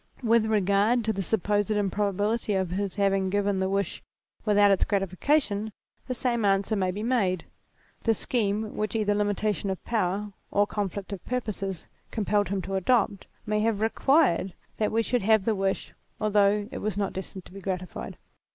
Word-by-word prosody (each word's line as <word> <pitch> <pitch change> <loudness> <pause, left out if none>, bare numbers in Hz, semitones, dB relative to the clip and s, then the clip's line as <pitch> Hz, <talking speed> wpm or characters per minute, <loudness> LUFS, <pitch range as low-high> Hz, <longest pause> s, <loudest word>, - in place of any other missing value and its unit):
With 230 -1 +4
regard 210 +3 +2
to 220 - +1
the 195 - -2
supposed 205 +1 0
improbability 205 +1 0
of 190 -2 0
his 195 0 -2
having 195 -1 +2
given 200 0 +1
the 190 0 0
wish 195 -2 -1 0.4
without 205 -1 +5
its 195 - +3
gratification, 205 - 0 0.4
the 255 - -2
same 235 -2 0
answer 195 +2 +2
may 190 -2 +1
be 200 +4 -3
made; 200 -8 +1 0.6
the 225 -1 +2
scheme 215 -2 -1
which 215 0 -2
either 210 -2 +2
limitation 205 -1 0
of 190 - -4
power, 205 -2 -1 0.2
or 205 0 +3
conflict 200 -1 -4
of 190 - -7
purposes, 200 -7 -3 0.2
compelled 205 -3 0
him 195 -1 -1
to 195 - -5
adopt, 200 0 +1 0.2
may 210 0 0
have 215 -1 +1
required 225 - +2 0.2
that 215 - 0
we 225 +1 +2
should 245 +2 0
have 215 0 +3
the 225 - +2
wish 195 -1 -2 0.3
although 205 -1 +3
it - - -5
were 215 - -1
not 200 -1 -1
destined 190 -1 -6
to - - -14
be 195 - -9
gratified. 185 -1 -5
205 Hz, 170 wpm, -27 LUFS, 195-220 Hz, 0.6 s, without